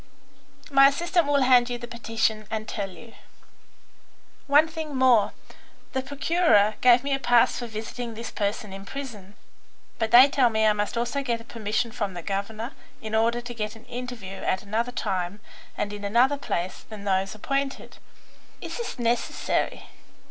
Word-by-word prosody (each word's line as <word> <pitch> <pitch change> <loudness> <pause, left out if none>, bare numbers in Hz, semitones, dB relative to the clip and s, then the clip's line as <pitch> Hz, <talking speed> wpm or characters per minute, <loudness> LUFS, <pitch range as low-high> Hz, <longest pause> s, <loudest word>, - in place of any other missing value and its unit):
"My 275 0 +8
assistant 340 +3 +1
will 285 -2 +3
hand 250 -1 +5
you 245 - -2
the 240 0 -8
petition 225 -2 -1
and 215 -1 -4
tell 200 -2 -3
you." 225 +5 -13 1.3
"One 295 +3 +5
thing 320 -3 -6
more. 255 -5 +4 0.6
The 265 - 0
Procureur 280 - +3
gave 245 0 +6
me 280 0 -1
a 270 - 0
pass 245 -2 +3
for 240 - -5
visiting 225 +1 -6
this 230 +1 -6
person 205 -1 -3
in 195 0 -8
prison, 210 -5 -8 0.6
but 225 -1 0
they 250 +4 +9
tell 270 -3 +3
me 220 -1 +1
I 215 - +5
must 210 +2 -2
also 240 +4 -1
get 240 -4 -1
a - - -11
permission 230 0 -2
from 200 -4 -3
the 175 - -6
governor 215 - -3 0.3
in 220 0 -7
order 230 +2 +2
to 240 0 -7
get 215 -1 -4
an 225 - -15
interview 240 -6 -7
at 190 - -1
another 225 +4 -1
time 190 -4 -3 0.4
and 205 0 -2
in 205 0 -7
another 240 +7 +3
place 180 -8 -3
than 215 -2 -10
those 195 0 0
appointed. 275 +5 -3 0.6
Is - - -6
this 470 -2 -5
necessary?" 235 0 -1
230 Hz, 170 wpm, -25 LUFS, 210-260 Hz, 1.3 s, they